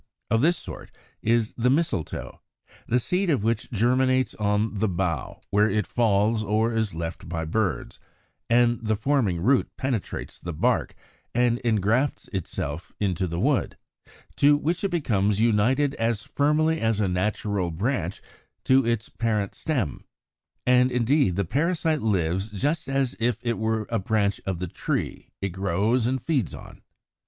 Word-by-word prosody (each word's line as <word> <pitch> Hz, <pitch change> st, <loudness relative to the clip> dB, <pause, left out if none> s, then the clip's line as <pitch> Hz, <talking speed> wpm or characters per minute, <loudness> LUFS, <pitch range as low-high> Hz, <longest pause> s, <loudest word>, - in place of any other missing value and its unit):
Of 115 Hz, 0 st, +3 dB
this 170 Hz, +4 st, +3 dB
sort -, -, -8 dB, 0.3 s
is 115 Hz, 0 st, +1 dB
the 125 Hz, +1 st, +2 dB
Mistletoe, 130 Hz, -, -1 dB, 0.5 s
the 125 Hz, -, +2 dB
seed 180 Hz, +9 st, 0 dB
of 140 Hz, -10 st, +1 dB
which 115 Hz, 0 st, 0 dB
germinates 130 Hz, +2 st, +2 dB
on 105 Hz, +1 st, 0 dB
the 105 Hz, +1 st, 0 dB
bough 85 Hz, -6 st, -2 dB
where 105 Hz, +2 st, +4 dB
it 105 Hz, -1 st, 0 dB
falls 110 Hz, -1 st, +2 dB
or 110 Hz, +3 st, +1 dB
is 110 Hz, -5 st, -1 dB
left 80 Hz, +1 st, -5 dB
by 80 Hz, -1 st, -2 dB
birds; 100 Hz, +4 st, -2 dB, 0.5 s
and 120 Hz, 0 st, +3 dB
the 110 Hz, 0 st, +1 dB
forming 110 Hz, -7 st, +1 dB
root 130 Hz, +8 st, +3 dB
penetrates 130 Hz, -6 st, -3 dB
the 85 Hz, -, -5 dB
bark 75 Hz, -, 0 dB, 0.4 s
and 120 Hz, 0 st, +2 dB
engrafts 115 Hz, +4 st, +1 dB
itself 85 Hz, -4 st, -4 dB
into 95 Hz, -3 st, 0 dB
the 85 Hz, 0 st, -3 dB
wood, -, -, +1 dB, 0.6 s
to 145 Hz, +1 st, +5 dB
which 165 Hz, +6 st, -1 dB
it 200 Hz, -, +1 dB
becomes 105 Hz, -, +1 dB
united 120 Hz, +6 st, +3 dB
as 115 Hz, -1 st, -1 dB
firmly 150 Hz, +3 st, +1 dB
as 110 Hz, -2 st, +1 dB
a 105 Hz, -, +2 dB
natural 95 Hz, 0 st, -1 dB
branch 95 Hz, +1 st, -2 dB, 0.4 s
to 135 Hz, +1 st, +4 dB
its 115 Hz, -1 st, -1 dB
parent 105 Hz, -4 st, -1 dB
stem; 130 Hz, -, -2 dB, 0.6 s
and 125 Hz, 0 st, +4 dB
indeed 125 Hz, -, +2 dB
the 100 Hz, 0 st, 0 dB
parasite 160 Hz, -, 0 dB
lives 95 Hz, -1 st, 0 dB
just 145 Hz, -, -1 dB
as 135 Hz, -5 st, 0 dB
if 120 Hz, +1 st, +1 dB
it 120 Hz, -2 st, -1 dB
were 110 Hz, -1 st, 0 dB
a 115 Hz, -, +1 dB
branch 100 Hz, 0 st, 0 dB
of 95 Hz, -2 st, -1 dB
the 90 Hz, +1 st, -4 dB
tree -, -, -3 dB
it 100 Hz, -, -1 dB
grows 100 Hz, +6 st, +1 dB
and 130 Hz, 0 st, -1 dB
feeds 135 Hz, -, 0 dB
on. -, -, -12 dB
110 Hz, 155 wpm, -25 LUFS, 100-130 Hz, 0.6 s, to